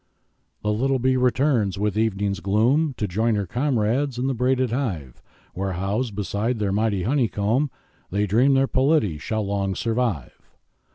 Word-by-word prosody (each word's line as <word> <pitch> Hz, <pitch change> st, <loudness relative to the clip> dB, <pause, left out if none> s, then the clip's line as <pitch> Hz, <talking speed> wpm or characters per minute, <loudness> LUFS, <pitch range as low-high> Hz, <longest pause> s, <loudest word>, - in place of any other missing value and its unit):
The 105 Hz, 0 st, +1 dB
little 135 Hz, +5 st, +1 dB
bee 130 Hz, +1 st, +1 dB
returns 125 Hz, -5 st, +1 dB
with 105 Hz, 0 st, -1 dB
evening's 100 Hz, -3 st, 0 dB
gloom, 125 Hz, +10 st, +2 dB
To 105 Hz, -, -1 dB
join 110 Hz, +5 st, +1 dB
her 100 Hz, -1 st, -1 dB
comrades 125 Hz, -, 0 dB
in 125 Hz, -, -1 dB
the 135 Hz, -, 0 dB
braided 130 Hz, 0 st, +1 dB
hive, 90 Hz, -, -3 dB, 0.3 s
Where, 95 Hz, +1 st, -3 dB
housed 100 Hz, +5 st, -2 dB
beside 105 Hz, +4 st, -1 dB
their 105 Hz, -2 st, -1 dB
mighty 100 Hz, -2 st, 0 dB
honeycomb, 120 Hz, +1 st, +1 dB, 0.4 s
They 100 Hz, +2 st, 0 dB
dream 125 Hz, +8 st, +3 dB
their 135 Hz, 0 st, +4 dB
polity 130 Hz, -, +1 dB
shall 110 Hz, +6 st, -2 dB
long 100 Hz, -1 st, -1 dB
survive. 115 Hz, -, -2 dB
110 Hz, 155 wpm, -23 LUFS, 100-130 Hz, 0.4 s, their